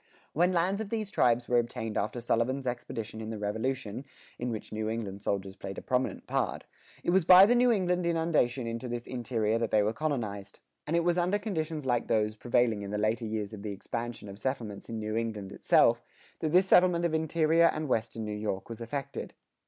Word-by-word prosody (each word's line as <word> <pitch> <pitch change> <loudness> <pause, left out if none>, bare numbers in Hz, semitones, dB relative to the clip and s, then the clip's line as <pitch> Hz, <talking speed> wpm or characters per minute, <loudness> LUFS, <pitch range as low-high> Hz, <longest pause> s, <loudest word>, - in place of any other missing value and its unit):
When 175 +4 +3
lands 185 +4 +1
of 215 - -5
these 215 -3 -3
tribes 120 - +2
were 120 -1 +4
obtained 115 -2 -4
after 110 +4 -1
Sullivan's 125 +3 0
expedition 115 -3 -4
in 110 - -5
the 110 - -4
Revolution 110 +3 -3 0.4
(in 125 - -2
which 110 -3 -5
New 110 0 -2
England 105 -3 -4
soldiers 95 -1 -2
played 95 -1 -7
a - - -5
prominent 130 0 -1
part), - - -1 0.4
it - - +1
was 190 0 +4
by 185 +3 +9
the 230 - +4
New 245 0 +4
England 180 -4 +1
inundation 160 -7 +1
into 115 +2 -4
this 120 0 -4
interior 115 -3 -1
that 115 -1 -1
they 105 -1 +3
were 105 +2 0
colonized. 115 -10 -3 0.3
And 160 - 0
it 170 - +3
was 175 +1 +2
under 180 +4 +2
conditions 160 -8 -3
like 120 -2 0
those 105 -1 +1
prevailing 120 -2 +1
in 100 - -6
the 105 - -2
later 110 +2 0
years 110 -1 -3
of 105 - -7
the 105 -1 -4
expansion 115 +2 -5
of 100 0 -9
settlements 115 -6 -4
in 115 - -4
New 110 0 -3
England 110 -4 -3
itself, - - +4 0.4
that 155 - -1
this 180 +3 +5
settlement 180 -2 +4
of 165 - 0
interior 160 +1 +3
and 155 -2 +1
western 115 -2 -1
New 105 - -4
York 105 -1 -3
was 115 0 -7
effected. 140 +3 -5
120 Hz, 205 wpm, -29 LUFS, 110-160 Hz, 0.4 s, by